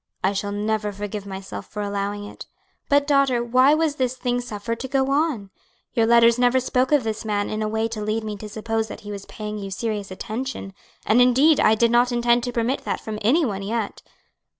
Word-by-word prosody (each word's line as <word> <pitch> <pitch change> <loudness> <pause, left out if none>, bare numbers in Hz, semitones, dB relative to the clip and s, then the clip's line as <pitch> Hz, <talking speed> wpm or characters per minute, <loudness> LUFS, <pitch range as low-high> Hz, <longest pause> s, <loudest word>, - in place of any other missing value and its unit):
"I 190 +2 +2
shall 205 +1 -2
never 210 0 -1
forgive 205 0 -6
myself 190 0 -7
for 210 0 -5
allowing 205 0 -3
it. 205 - -10 0.4
But, 285 0 +4
daughter, 275 -4 +3
why 255 +5 +4
was 310 -2 0
this 255 -1 -1
thing 245 -1 -1
suffered 230 -1 -5
to 265 - -4
go 265 0 +1
on? 275 -10 0 0.4
Your 225 -1 +2
letters 235 0 +5
never 250 +1 +4
spoke 255 +1 0
of 295 -4 +4
this 220 0 -3
man 205 -2 -1
in 215 0 -2
a 215 - 0
way 220 +1 0
to 220 -2 -5
lead 215 +1 -1
me 215 -1 -4
to 210 +1 -8
suppose 220 +1 -2
that - - -9
he 205 - -8
was 200 -1 -7
paying 210 -1 -6
you 195 -1 -6
serious 205 0 -3
attention; 215 +1 -5 0.3
and 225 +4 +4
indeed 265 +5 +5
I 220 - +5
did 235 +1 +3
not 240 +1 +4
intend 240 0 +2
to 245 - -3
permit 240 +3 -1
that - - -2
from 215 -1 -6
any 285 +10 +3
one 200 -5 -3
yet." 215 +1 -3
225 Hz, 220 wpm, -23 LUFS, 210-250 Hz, 0.4 s, letters